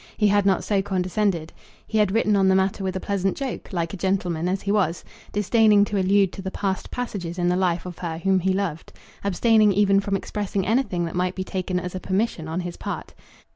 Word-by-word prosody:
He 210 -1 +3
had 205 0 +3
not 190 -2 +2
so 200 -2 +1
condescended. 185 -3 -1 0.3
He 220 - -1
had 210 -3 +3
written 215 0 +2
on 195 -1 +3
the 190 - +4
matter 190 +1 +1
with 190 -1 -2
a - - -1
pleasant 195 -1 -1
joke, 270 -3 -5
like 170 -2 -2
a - - -4
gentleman 180 -3 -1
as 190 +1 -2
he 200 - 0
was, 195 -5 +1 0.3
disdaining 210 0 +4
to 205 -1 -1
allude 195 0 +3
to - - -7
the 190 - -4
past 190 -1 -3
passages 195 -8 -4
in 175 0 +1
the 180 - +2
life 180 -2 0
of 180 -2 -8
her 165 -2 -4
whom 190 +3 +2
he 190 +2 +1
loved, 185 -5 -3 0.3
abstaining 215 +2 +4
even 200 0 +4
from 200 0 -1
expressing 195 -1 -2
anything 215 -6 +1
that 165 - -5
might 180 +1 -1
be 185 - -3
taken 185 -1 -2
as 180 0 -6
a 185 - -4
permission 190 -4 -1
on 165 +3 -2
his 175 -1 -6
part. - - -6
190 Hz, 225 wpm, -24 LUFS, 180-205 Hz, 0.3 s, the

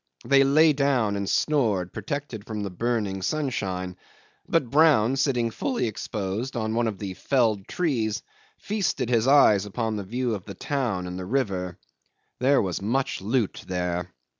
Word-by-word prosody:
They 135 0 +5
lay 155 +3 +5
down 135 -7 +1
and 100 -1 -2
snored, 110 - +1
protected 140 -8 -5
from 105 -2 -4
the 100 - -4
burning 105 -1 -1
sunshine; 95 -8 -2 0.5
but 140 -8 +1
Brown, 140 -6 +5
sitting 130 -4 +1
fully 255 - -1
exposed 110 +2 -3
on 110 -1 -1
one 120 0 +1
of 105 -3 -3
the 95 -2 -5
felled 110 -3 +1
trees, 115 -11 -1 0.3
feasted 200 - -1
his 115 0 +3
eyes 105 -8 +5
upon 110 +1 -2
the 100 - -4
view 120 +4 -2
of 100 -3 -5
the 100 - -8
town 120 -8 -2
and 90 0 -5
the 90 - -5
river. 95 -8 -1 0.6
There 135 0 +4
was 95 -2 -3
much 125 +5 -1
loot 110 +1 -1
there. 90 -1 -2
115 Hz, 160 wpm, -25 LUFS, 100-135 Hz, 0.6 s, They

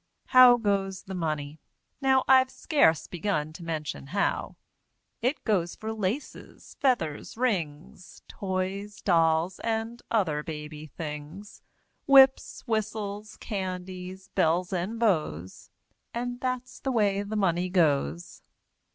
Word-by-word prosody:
How 250 -1 +8
goes 195 -4 -1
the 190 - -8
Money? 155 -4 -3 0.4
Now, 265 -1 +4
I've 260 0 +6
scarce 260 - +2
begun 160 -4 -2
to 170 - -10
mention 155 -4 -4
how; 200 +7 -1 0.7
It 255 +5 -1
goes 180 -6 0
for 220 0 -5
laces, 220 +6 -5
feathers, 220 - 0
rings, 180 -8 -3
Toys, 195 +2 -4
dolls 165 0 +2
and 225 +1 -3
other 170 -10 +1
baby 150 0 -7
things, 155 +6 -8 0.5
Whips, 270 -1 +5
whistles, 215 -2 -3
candies, 185 -1 -6
bells 175 +3 +1
and 190 +6 -2
bows, 95 - -1 0.5
And 245 +1 -3
that's 255 -1 -3
the 270 - -2
way 205 -4 +2
the 205 +2 -5
Money 180 -3 +1
goes! 140 - 0
190 Hz, 115 wpm, -27 LUFS, 160-220 Hz, 0.7 s, How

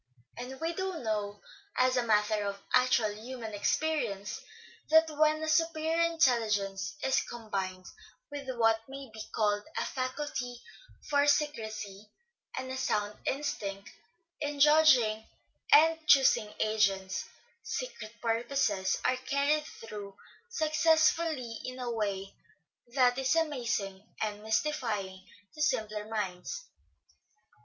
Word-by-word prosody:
And 255 +2 -7
we 330 +1 -1
do 380 0 -3
know, 210 -5 -3 0.4
as 255 0 +3
a 250 - +3
matter 215 -2 +2
of 200 0 -3
actual 250 -4 +3
human 225 0 -7
experience, 215 -3 -1 0.5
that 320 +1 +6
when 310 +1 +3
a - - -2
superior 320 +1 +2
intelligence 215 -11 +1
is 265 - +3
combined 195 -5 -5 0.5
with 280 -2 -6
what 225 -1 +4
may 270 -2 -8
be 220 - -7
called 205 -1 +1 0.2
a - - 0
faculty 255 -2 -3 0.5
for 285 0 +3
secrecy 220 -9 -1 0.5
and 260 0 -4
a 260 - -3
sound 210 -5 -1
instinct 205 -9 -3 0.5
in 290 -1 -3
judging 275 -8 +5 0.5
and 320 +2 +7
choosing 260 -6 +5
agents, 195 -3 +1 0.3
secret 230 - -5
purposes 225 -4 +1
are 255 - +3
carried 280 +3 +1
through 205 -3 -9 0.3
success 315 -5 +4
fully 275 -9 -4
in 255 0 -6
a 245 -1 -3
way 200 -3 -2 0.6
that 250 -1 +4
is 265 +3 +2
amazing 235 -11 -1 0.2
and 210 -1 -2
mystifying 220 -5 -1 0.3
to 305 - -7
simpler 215 -7 0
minds. 215 - -4
240 Hz, 115 wpm, -30 LUFS, 210-295 Hz, 0.6 s, and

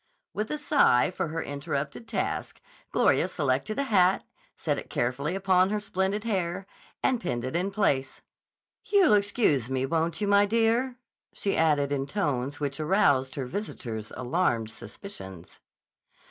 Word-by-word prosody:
With 215 +1 -3
a 300 - -2
sigh 280 - +3
for 180 - -2
her 160 +1 -3
interrupted 145 +7 -4
task, 215 -4 -3 0.3
Gloria - - +3
selected 215 - -1
a 280 - +1
hat, 190 -7 +3 0.3
set - - -1
it - - -10
carefully 140 +8 -1
upon 190 -1 +3
her 210 +1 0
splendid 200 0 -1
hair 190 -4 -2 0.4
and 255 -3 +2
pinned 120 -8 -2
it 130 - -4
in 180 +3 +1
place. 170 -10 0 0.6
"You'll 390 - +4
excuse 200 - +2
me, 130 0 0
won't 165 +4 0
you, 205 - -1
my 200 0 +5
dear?" 230 +4 +2 0.4
she 200 - -1
added 150 -3 +2
in 140 -1 -1
tones 145 -6 -2
which 140 -1 -2
aroused 145 -6 +2
her 135 - -3
visitor's 120 - -5
alarmed 120 -5 0
suspicions. 95 - -10
175 Hz, 145 wpm, -27 LUFS, 135-205 Hz, 0.6 s, my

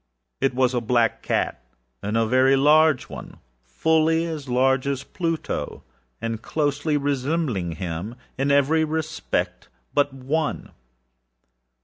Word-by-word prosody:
It 135 -1 +1
was 130 0 +2
a 120 - 0
black 115 -1 +1
catâa - - -1 0.7
very 130 +3 +4
large 150 +1 +4
oneâfully 160 - -1
as 155 -5 -5
large 130 +2 +2
as 140 -1 -1
Pluto, 165 -3 -3 0.4
and 115 -1 -3
closely 145 +1 0
resembling 140 - -1
him 85 +6 -5 0.2
in 135 +2 0
every 140 +3 +3
respect 155 0 -2 0.2
but 145 0 +2
one. 140 +4 -2
135 Hz, 105 wpm, -24 LUFS, 125-155 Hz, 0.7 s, very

